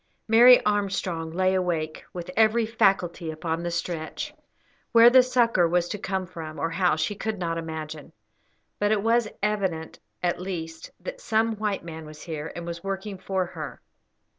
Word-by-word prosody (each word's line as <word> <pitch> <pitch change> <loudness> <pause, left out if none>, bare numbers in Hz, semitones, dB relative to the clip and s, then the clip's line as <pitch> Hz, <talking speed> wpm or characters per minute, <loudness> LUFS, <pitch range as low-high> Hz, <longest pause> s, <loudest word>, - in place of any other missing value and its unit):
Mary 240 +3 +8
Armstrong 195 -5 -1
lay 185 +3 +1
awake, 170 -4 -1
with 175 0 -6
every 225 +1 +4
faculty 190 -6 +1
upon 160 +1 -3
the 175 - -2
stretch. 170 -2 -4 0.6
Where 235 +1 +8
the 260 0 +8
succour 235 -8 +3
was 175 +1 +1
to 210 - -4
come 190 -1 -2
from, 165 -3 -8
or 165 - -1
how, 180 0 +2
she 155 +6 -1
could 215 +1 -3
not 165 -2 -2
imagine; 160 -2 -6 0.7
but 205 0 +2
it 210 -2 +2
was 230 0 +3 0.2
evident, 190 -6 -1 0.2
at 175 0 0
least, 165 -3 -5
that - - -7
some 225 0 +1
white 210 -3 -2
man 160 -2 -8
was 155 0 -11
here, 160 -2 -5
and 170 - -6
was 170 0 -6
working 195 0 -4
for 190 -1 -1
her. 155 -4 -7
180 Hz, 165 wpm, -26 LUFS, 165-210 Hz, 0.7 s, Mary